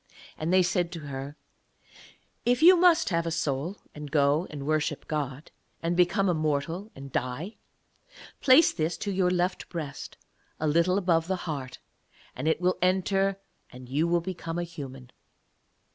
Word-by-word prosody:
And 155 +2 -2
they 185 0 +5
said 175 -1 0
to 165 - -6
her: 140 0 -7 1.1
'If 245 +5 +2
you 365 +2 +9
must 345 -2 +4
have 170 -2 0
a - - +1
soul 160 +3 -2 0.2
and 150 -1 -8
go 145 +3 +2
and 140 -2 -7
worship 155 0 -1
God, 145 -1 -4 0.3
and 170 +1 0
become 180 +3 +3
a 180 - +3
mortal 155 +5 -2
and 135 0 -10
die, 135 - -3 0.8
place 270 +5 +6
this 160 0 -1
to 205 - -3
your 185 -1 +2
left 180 +1 -1
breast 155 -5 -6 0.4
a 155 - -1
little 170 +5 +3
above 170 -4 +2
the 190 - 0
heart, 140 -6 -5 0.6
and 130 +5 -3
it 160 - +2
will 180 +1 +1
enter 195 +1 +1 0.3
and 125 0 -12
you 150 +5 +1
will 170 0 +2
become 170 -2 -5
a 175 - -1
human. 135 -7 -9
165 Hz, 160 wpm, -27 LUFS, 145-185 Hz, 1.1 s, you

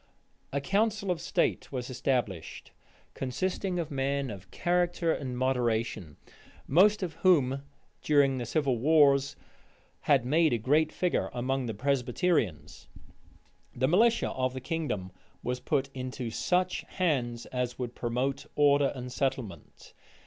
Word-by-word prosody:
A 140 - 0
council 200 +5 0
of 170 -2 -2
state 170 0 0
was 125 -3 -4
established, 125 - -2 0.4
consisting 180 +7 -2
of 165 -4 -3
men 140 -1 -1
of 95 -2 -10
character 175 -1 +1
and 130 -3 -4
moderation; 115 - -1 0.5
most 200 +7 +4
of 170 -3 -3
whom, 140 -7 +3 0.4
during 140 -3 +3
the 120 - -4
civil 140 -6 0
wars, 140 -1 +4 0.7
had 135 -5 +4
made 155 +2 +3
a - - +2
great 150 +7 +2
figure 180 -1 0
among 130 +1 -1
the 110 - -4
Presbyterians. 125 - -1 0.9
The 130 +2 +1
militia 225 - +3
of 130 0 -2
the - - -3
kingdom 130 - -3 0.3
was 125 +1 -2
put 135 +1 -1
into 130 -2 -5
such 180 +9 0
hands 125 -10 -1
as 125 -1 -3
would 125 -2 -4
promote 125 +4 -2
order 145 -1 +4
and 125 -1 -6
settlement. 125 - -4
135 Hz, 130 wpm, -29 LUFS, 125-160 Hz, 0.9 s, most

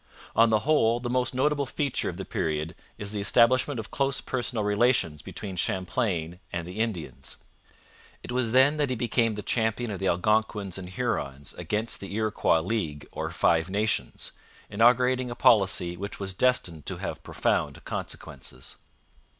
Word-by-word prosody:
On 115 0 +6
the 110 -1 +3
whole, 120 -4 +3
the 120 0 -3
most 125 0 0
notable 145 +1 +1
feature 140 0 -1
of - - -6
the - - -5
period 80 0 -2 0.2
is 100 0 -3
the 105 -1 -2
establishment 125 +5 +3
of 110 - -7
close 135 0 0
personal 120 -3 -2
relations 105 - +2
between 95 -3 -7
Champlain 90 -1 -1
and 85 -1 -4
the 90 +4 -7
Indians. 90 - -3 0.9
It - - -6
was 125 -2 +1
then 135 +5 +5
that 145 -3 +1
he 130 - 0
became 115 -1 +1
the 105 0 -5
champion 110 0 0
of 100 - -4
the 95 - 0
Algonquins 100 +1 +1
and 90 -1 -7
Hurons 75 - -3
against 110 +2 -2
the 100 0 -6
Iroquois 110 -6 +2
League 80 -7 -3
or - - -3
Five 80 +1 +2
Nations, 105 +3 -1 0.4
inaugurating 125 +3 +4
a 120 - -5
policy 95 -6 +4
which 100 +3 -6
was 95 -1 -2
destined 90 - +1
to - - -2
have - - -5
profound - - -1
consequences. 65 -2 -7
110 Hz, 160 wpm, -27 LUFS, 90-120 Hz, 0.9 s, On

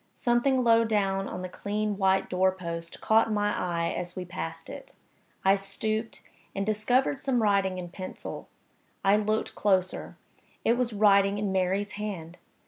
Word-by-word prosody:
Something 250 +2 +2
low 230 -1 +5
down 195 -3 0
on 180 - -5
the - - -3
clean 210 +3 -2
white 190 -1 +2
door 185 +1 +2
post 170 -2 -6
caught 220 +1 +3
my 205 0 +1
eye 170 -2 -1
as 180 0 -5
we 185 - -4
passed 165 -2 -6
it. - - -10 0.5
I 195 +1 +6
stooped, 215 +3 -3 0.3
and 195 0 -1
discovered 245 +6 +1
some 260 -5 0
writing 195 -3 +2
in 175 -1 -6
pencil. 185 +1 -7 0.6
I 195 +1 +6
looked 215 +1 -1
closer 185 -3 0 0.5
it 230 - +5
was 240 -1 0
writing 200 -1 +4
in 205 -1 -1
Mary's 190 +2 0
hand! 180 -5 -6
200 Hz, 155 wpm, -28 LUFS, 185-215 Hz, 0.6 s, I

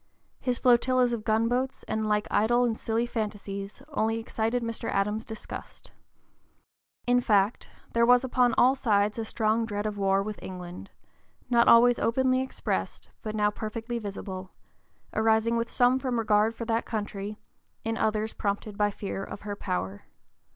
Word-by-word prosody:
His 250 -2 -1
flotillas 250 0 +3
of 225 -2 -3
gunboats 230 +4 0
and 220 0 -2
like 210 0 +1
idle 240 +3 +3
and 230 -2 0
silly 225 +1 -1
fantasies 205 -1 -5
only 225 -6 0
excited 225 +1 -1
Mr. 230 -1 -4
Adams's 210 +3 -1
disgust. 220 -1 -9 1.1
In 245 0 +3
fact, 205 -1 +2 0.2
there 235 - +3
was 245 +1 +6
upon 250 -1 +2
all 255 +2 +6
sides 210 -5 +1
a - - -1
strong 220 +1 +1
dread 205 -2 -3
of 210 -1 -3
a - - -3
war 195 0 +3
with 210 0 -6
England, 180 0 -8 0.6
not 235 -1 +5
always 240 +1 +7
openly 255 +2 +2
expressed, 260 - -3
but 215 -1 -4
now 210 -1 +2
perfectly 225 +3 -4
visible, 195 -3 -6 0.6
arising 220 +1 +2
with 230 0 -1
some 250 +1 +3
from 255 -3 -1
regard 220 0 +2
for 230 - -5
that 225 0 0
country, 210 -2 -4 0.5
in 225 0 -1
others 220 0 0
prompted 205 +1 -3
by 205 0 +3
fear 200 -1 -5
of 200 - -8
her 205 -1 -5
power. 95 - -4
220 Hz, 160 wpm, -28 LUFS, 210-240 Hz, 1.1 s, always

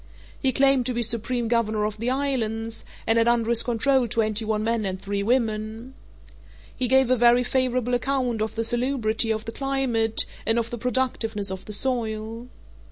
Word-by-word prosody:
He 265 - +1
claimed 270 -1 +3
to 250 - -2
be 240 - 0
supreme 235 +1 +1
governor 220 -2 +1
of 210 0 -4
the 235 +2 -1
islands, 230 -5 -2 0.2
and 225 +1 +3
had 230 - +2
under 235 -1 +2
his 235 -1 +3
control 255 +1 +1
twenty 215 0 +1
one 215 -1 -1
men 230 0 0
and 190 -1 -3
three 200 +1 -3
women. 225 +1 -1 0.8
He 255 - -1
gave 265 0 +3
a - - +5
very 240 +1 +5
favourable 250 -1 0
account 245 -2 0
of 220 0 -2
the 225 - -1
salubrity 235 -2 0
of 220 0 -1
the 225 - -5
climate 250 -5 0 0.2
and 225 +1 +1
of 230 0 -1
the 240 - -5
productiveness 225 -5 0
of 190 0 -7
the 210 - -6
soil. 225 -1 -2
230 Hz, 180 wpm, -24 LUFS, 220-250 Hz, 0.8 s, a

